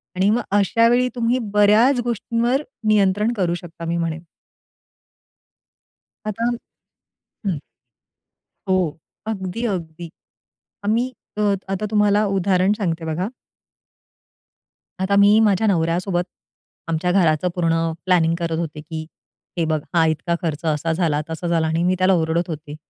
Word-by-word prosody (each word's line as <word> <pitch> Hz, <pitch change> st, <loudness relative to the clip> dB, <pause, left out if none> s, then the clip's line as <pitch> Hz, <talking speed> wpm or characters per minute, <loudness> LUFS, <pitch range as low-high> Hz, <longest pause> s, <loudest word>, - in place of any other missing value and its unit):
आणि 190 Hz, +2 st, +2 dB
मग 230 Hz, +3 st, +2 dB, 0.2 s
अशा 230 Hz, +3 st, +3 dB
वेळी 245 Hz, +2 st, +3 dB
तुम्ही 240 Hz, +1 st, +1 dB
बऱ्याच 215 Hz, +6 st, +5 dB
गोष्टींवर 235 Hz, +3 st, 0 dB, 0.3 s
नियंत्रण 210 Hz, +2 st, +3 dB
करू 180 Hz, -3 st, +1 dB
शकता 170 Hz, -2 st, -10 dB
मी 170 Hz, +1 st, -1 dB
म्हणेन. 165 Hz, -1 st, -3 dB, 2.0 s
आता 215 Hz, +2 st, -2 dB, 1.0 s
हं. 185 Hz, -5 st, 0 dB, 1.1 s
हो, 190 Hz, -, +4 dB, 0.5 s
अगदी, 210 Hz, +1 st, -3 dB
अगदी. 170 Hz, -5 st, -4 dB, 0.8 s
आम्ही 235 Hz, +5 st, +1 dB, 0.3 s
अ, -, -, 0 dB, 0.3 s
आता 195 Hz, +2 st, -2 dB
तुम्हाला 210 Hz, 0 st, +3 dB
उदाहरण 190 Hz, +1 st, +2 dB
सांगते 170 Hz, -5 st, -2 dB
बघा. 160 Hz, +5 st, -2 dB, 1.7 s
आता 195 Hz, +1 st, +1 dB
मी 205 Hz, +2 st, +6 dB
माझ्या 215 Hz, 0 st, +3 dB
नवऱ्यासोबत 175 Hz, 0 st, +1 dB, 0.6 s
आमच्या 165 Hz, +2 st, 0 dB
घराचं 175 Hz, -2 st, +2 dB
पूर्ण 165 Hz, -2 st, +1 dB
प्लॅनिंग 170 Hz, -3 st, +3 dB
करत 165 Hz, -1 st, -1 dB
होते 155 Hz, -2 st, -4 dB
की 160 Hz, 0 st, -6 dB, 0.5 s
हे 165 Hz, -, +1 dB
बघ, 155 Hz, -1 st, 0 dB
हा 165 Hz, -2 st, +4 dB
इतका 160 Hz, +2 st, 0 dB
खर्च 165 Hz, -1 st, -3 dB
असा 155 Hz, +1 st, 0 dB
झाला, 160 Hz, -3 st, +1 dB
तसा 160 Hz, +2 st, -4 dB
झाला 165 Hz, -2 st, +1 dB
आणि 160 Hz, +2 st, 0 dB
मी 180 Hz, +1 st, +2 dB
त्याला 185 Hz, +1 st, +3 dB
ओरडत 165 Hz, 0 st, +1 dB
होते. 150 Hz, -2 st, -6 dB
180 Hz, 130 wpm, -21 LUFS, 165-210 Hz, 2.0 s, मी